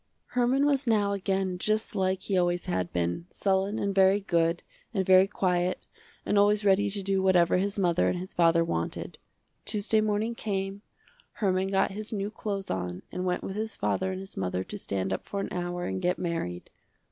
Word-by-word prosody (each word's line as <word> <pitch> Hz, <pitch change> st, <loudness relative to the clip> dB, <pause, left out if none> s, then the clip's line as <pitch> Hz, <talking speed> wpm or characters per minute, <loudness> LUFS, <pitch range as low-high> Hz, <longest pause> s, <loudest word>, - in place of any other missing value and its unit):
Herman 250 Hz, +3 st, +2 dB
was 280 Hz, -2 st, +1 dB
now 210 Hz, -3 st, +3 dB
again 190 Hz, -2 st, -1 dB
just 215 Hz, +2 st, 0 dB
like 190 Hz, -1 st, 0 dB
he 195 Hz, -, -1 dB
always 175 Hz, -1 st, +1 dB
had 90 Hz, -1 st, -2 dB
been, 85 Hz, -, -2 dB
sullen 195 Hz, +2 st, 0 dB
and 200 Hz, 0 st, -1 dB
very 195 Hz, +1 st, +5 dB
good, 170 Hz, -3 st, +1 dB, 0.3 s
and 190 Hz, -1 st, +1 dB
very 185 Hz, +1 st, +6 dB
quiet, 180 Hz, -2 st, 0 dB, 0.4 s
and 205 Hz, -, +3 dB
always 205 Hz, +1 st, +3 dB
ready 200 Hz, +1 st, +4 dB
to 200 Hz, 0 st, -2 dB
do 195 Hz, 0 st, +1 dB
whatever 180 Hz, -2 st, +4 dB
his 200 Hz, +2 st, -1 dB
mother 175 Hz, -3 st, +2 dB
and -, -, -1 dB
his 185 Hz, +1 st, -6 dB
father 170 Hz, -1 st, +4 dB
wanted. 85 Hz, -, -3 dB, 0.4 s
Tuesday 215 Hz, 0 st, +2 dB
morning 215 Hz, +2 st, 0 dB
came, 195 Hz, -3 st, -3 dB, 0.5 s
Herman 190 Hz, -2 st, 0 dB
got 195 Hz, 0 st, +1 dB
his 210 Hz, +2 st, -6 dB
new 205 Hz, -1 st, -2 dB
clothes 200 Hz, -3 st, -4 dB
on 90 Hz, -1 st, -3 dB
and 180 Hz, -, -3 dB
went 180 Hz, 0 st, -1 dB
with 190 Hz, -, -5 dB
his 220 Hz, 0 st, -3 dB
father 190 Hz, -, 0 dB
and 185 Hz, -, -4 dB
his 195 Hz, 0 st, -9 dB
mother 90 Hz, 0 st, -2 dB
to -, -, -7 dB
stand 95 Hz, -1 st, -2 dB
up -, -, -3 dB
for 200 Hz, -, -3 dB
an -, -, -3 dB
hour 175 Hz, 0 st, -3 dB
and 95 Hz, 0 st, -3 dB
get 180 Hz, +1 st, +1 dB
married. 165 Hz, -, -4 dB
190 Hz, 195 wpm, -28 LUFS, 175-205 Hz, 0.5 s, very